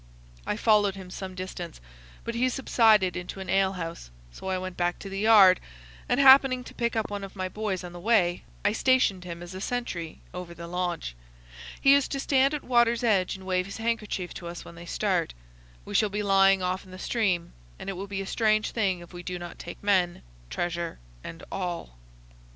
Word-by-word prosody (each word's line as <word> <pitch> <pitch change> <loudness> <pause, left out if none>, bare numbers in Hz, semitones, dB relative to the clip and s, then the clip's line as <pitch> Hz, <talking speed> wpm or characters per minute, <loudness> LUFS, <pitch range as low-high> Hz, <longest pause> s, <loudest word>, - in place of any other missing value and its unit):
I 210 - -1
followed 210 -3 +3
him 185 -2 -10
some 185 0 -6
distance, 180 -2 -6 0.4
but 235 - -4
he 250 +2 +1
subsided 220 -7 +3
into 180 +2 -6
an 190 -2 -4
ale 195 0 +3
house: 165 - -6 0.2
so 125 - -9
I 190 0 0
went 185 0 -5
back 175 0 0
to 195 - -8
the 195 0 -4
yard, 205 -4 +7 0.5
and, - - +2
happening 265 -2 +7
to - - -11
pick 235 -1 -1
up 220 -2 -1
one 200 -1 -4
of 195 0 -9
my 185 -1 -2
boys 195 -1 -3
on 175 -1 -8
the 175 - -8
way, 180 -4 +2 0.2
I 205 - +4
stationed 220 -6 +2
him 170 -1 -7
as 175 +1 -9
a 185 - -7
sentry 190 -10 -4
over 180 -1 -7
the 170 - -8
launch. 175 - -3 0.7
He 275 - +6
is 280 -1 +4
to 275 - -3
stand 275 +1 +3
at 295 - -5
water's 240 -1 +3
edge 195 -6 +2
and 190 0 -11
wave 185 0 0
his 200 - -7
handkerchief 225 -5 -2
to 175 - -8
us 170 0 -7
when - - -11
they 170 0 -11
start. - - 0 0.5
We - - -8
shall 215 - +3
be 210 +1 -2
lying 195 -1 +4
off 185 +1 -1
in 190 - -17
the 185 - -10
stream, 185 -5 -1 0.2
and - - -9
it 195 - -2
will 195 +2 -6
be 195 -1 -3
a - - -8
strange 215 +1 +1
thing 190 -6 0
if 175 - -13
we 175 - -7
do 180 0 -5
not 175 -1 -9
take 175 - -9
men, 185 -4 +2 0.3
treasure, 170 - -3 0.3
and 165 - -9
all." 175 - -4
190 Hz, 215 wpm, -27 LUFS, 175-220 Hz, 0.7 s, yard